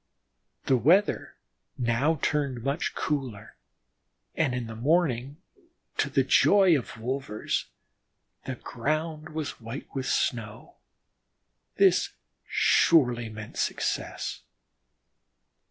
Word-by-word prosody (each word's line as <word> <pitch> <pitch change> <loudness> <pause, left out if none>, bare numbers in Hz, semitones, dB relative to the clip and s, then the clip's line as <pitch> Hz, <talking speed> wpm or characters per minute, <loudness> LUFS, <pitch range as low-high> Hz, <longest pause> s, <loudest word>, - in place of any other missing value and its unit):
The 130 - +4
weather 180 - +3 0.4
now 130 +7 +1
turned 140 -5 0
much 140 +5 -1
cooler, 130 -9 -3 0.8
and 125 - 0
in 125 -1 -3
the 115 0 -7
morning, 140 0 +1 0.6
to - - +1
the - - +2
joy 195 -4 +5
of 135 - -3
the 110 - -13
wolvers, 130 -3 -2 0.8
the 130 - -3
ground 155 +6 -3
was 155 -5 -5
white 115 +5 -7
with 135 -1 -3
snow. 110 -3 -2 1.0
This - - +3 0.3
surely 125 -8 +3
meant 105 0 -9
success. - - -2
130 Hz, 100 wpm, -27 LUFS, 115-155 Hz, 1.0 s, joy